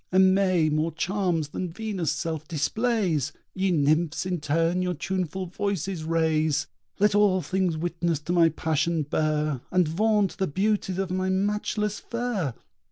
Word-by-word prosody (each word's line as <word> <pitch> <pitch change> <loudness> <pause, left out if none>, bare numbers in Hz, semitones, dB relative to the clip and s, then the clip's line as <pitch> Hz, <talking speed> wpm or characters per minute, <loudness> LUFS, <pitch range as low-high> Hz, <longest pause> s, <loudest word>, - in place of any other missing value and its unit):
Aimée 185 -3 +4
more 155 +2 0
charms 180 -6 0
than 180 +2 -4
Venus' 195 -4 -2
self 160 -2 -3
displays! 175 - 0 0.2
Ye 190 0 0
Nymphs 155 +1 +1
in 180 -2 -1
turn 165 +4 +1
your 180 -1 -1
tuneful 185 +2 -2
voices 190 -2 -3
raise. 160 -2 +1 0.3
Let 210 0 +3
all 200 -3 +3
things 185 -4 0
witness 170 0 -1
to 170 +3 -2
my 170 -2 +5
passion 160 +1 0
bear, 150 -2 0
And 180 -3 +2
vaunt 205 +3 +1
the 190 - +1
beauties 195 +3 0
of 190 -2 -2
my 185 0 0
matchless 210 +2 -1
fair! 235 - -2
175 Hz, 145 wpm, -26 LUFS, 160-195 Hz, 0.3 s, my